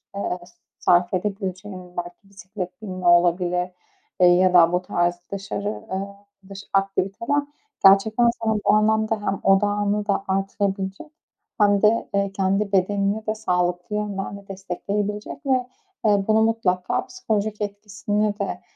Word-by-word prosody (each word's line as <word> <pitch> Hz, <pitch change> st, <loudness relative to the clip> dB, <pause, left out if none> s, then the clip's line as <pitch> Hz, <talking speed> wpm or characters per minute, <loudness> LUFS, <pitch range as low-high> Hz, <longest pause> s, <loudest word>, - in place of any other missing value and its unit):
eee, 190 Hz, -2 st, -3 dB, 0.4 s
sarf 175 Hz, 0 st, +3 dB
edebileceğin 185 Hz, -1 st, -4 dB
belki 175 Hz, +3 st, -7 dB
bisiklet 190 Hz, 0 st, -8 dB
binme 185 Hz, -3 st, -4 dB
olabilir, 175 Hz, +1 st, +3 dB, 0.5 s
eee, 180 Hz, -, +8 dB
ya 180 Hz, +1 st, +4 dB
da 170 Hz, -1 st, +6 dB
bu 180 Hz, -, +2 dB
tarz 175 Hz, -1 st, 0 dB, 0.2 s
dışarı, 200 Hz, +1 st, -4 dB, 0.2 s
eee, 195 Hz, +1 st, -4 dB, 0.3 s
dış 195 Hz, 0 st, -8 dB
aktiviteler. 195 Hz, +8 st, 0 dB, 0.4 s
Gerçekten 215 Hz, +5 st, +5 dB
sana 220 Hz, -1 st, +1 dB
bu 205 Hz, -, +5 dB
anlamda 220 Hz, +1 st, +2 dB
hem 195 Hz, -2 st, -2 dB
odağını 205 Hz, +1 st, +2 dB
da 200 Hz, -1 st, 0 dB
artırabilecek 195 Hz, +2 st, -2 dB, 0.5 s
hem 205 Hz, -1 st, +4 dB
de, 220 Hz, +2 st, +3 dB
eee, 200 Hz, -1 st, 0 dB
kendi 195 Hz, +1 st, 0 dB
bedenini 200 Hz, +3 st, +1 dB
de 215 Hz, -, 0 dB
sağlıklı 180 Hz, -2 st, -1 dB
yönden 200 Hz, -1 st, -3 dB
de 200 Hz, -, -15 dB
destekleyebilecek 200 Hz, -, -4 dB
ve, 255 Hz, -2 st, +1 dB, 0.4 s
eee, 205 Hz, -2 st, +3 dB
bunu 220 Hz, 0 st, +4 dB
mutlaka 210 Hz, -5 st, 0 dB
psikolojik 215 Hz, -, -3 dB
etkisini 205 Hz, 0 st, -2 dB
de, 195 Hz, -2 st, -3 dB
200 Hz, 130 wpm, -23 LUFS, 185-210 Hz, 0.5 s, eee